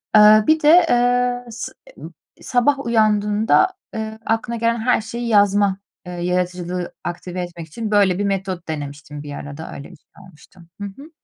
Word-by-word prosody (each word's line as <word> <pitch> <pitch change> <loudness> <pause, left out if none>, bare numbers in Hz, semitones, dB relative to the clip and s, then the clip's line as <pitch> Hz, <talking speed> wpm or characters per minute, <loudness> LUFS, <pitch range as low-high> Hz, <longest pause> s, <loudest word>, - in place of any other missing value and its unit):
Eee, 215 0 +8
bir 315 0 +4
de, 335 +4 +6
eee, 245 0 +2
s 235 +2 -6 0.3
emm, - - -10 0.3
sabah 265 +3 +1
uyandığında, 215 - +3 0.3
eee, 220 0 -5
aklına 225 +1 -1
gelen 230 +1 0
her 245 0 +2
şeyi 235 +3 -5
yazma, 205 -2 +3 0.3
eee, 180 - -7
yaratıcılığı 180 0 -2
aktive 180 +1 -5
etmek 175 -2 -7
için 215 +7 -5
böyle 200 -3 +3
bir - - 0
metot 190 -3 -3
denemiştim 145 -1 -6
bir 145 -1 -7
ara 145 0 -8
da, 160 - -8
öyle 140 +5 -10
bir - - -13
şey - - -43 0.2
olmuştu. 180 +1 -20 0.2
Hı - - -3
hı. 275 +10 -12
205 Hz, 170 wpm, -20 LUFS, 180-235 Hz, 0.3 s, Eee